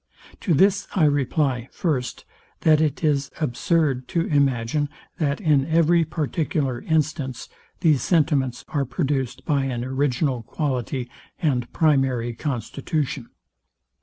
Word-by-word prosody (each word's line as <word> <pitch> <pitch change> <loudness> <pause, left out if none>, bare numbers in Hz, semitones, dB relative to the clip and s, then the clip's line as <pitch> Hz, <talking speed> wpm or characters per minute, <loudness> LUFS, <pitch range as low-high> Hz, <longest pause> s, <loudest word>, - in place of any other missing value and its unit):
To 175 -7 +1
this 195 +6 +3
I 185 - +3
reply, 140 -3 +1
first, 135 -8 -2 0.4
that 155 -1 +5
it 155 +1 0
is 140 -2 +1
absurd 145 -2 +1
to 170 - 0
imagine, 140 0 +1 0.3
that 145 -2 0
in 150 -7 +2
every 165 +1 +4
particular 150 -4 -1
instance, 150 -5 -1 0.3
these 155 -5 +4
sentiments 140 -7 +1
are 145 -2 0
produced 135 0 -2
by 140 -4 +1
an 125 -2 -2
original 130 -1 0
quality 130 -1 -2 0.3
and 130 -8 0
primary 135 -6 +2
constitution. 135 - -3
140 Hz, 115 wpm, -23 LUFS, 130-155 Hz, 0.4 s, that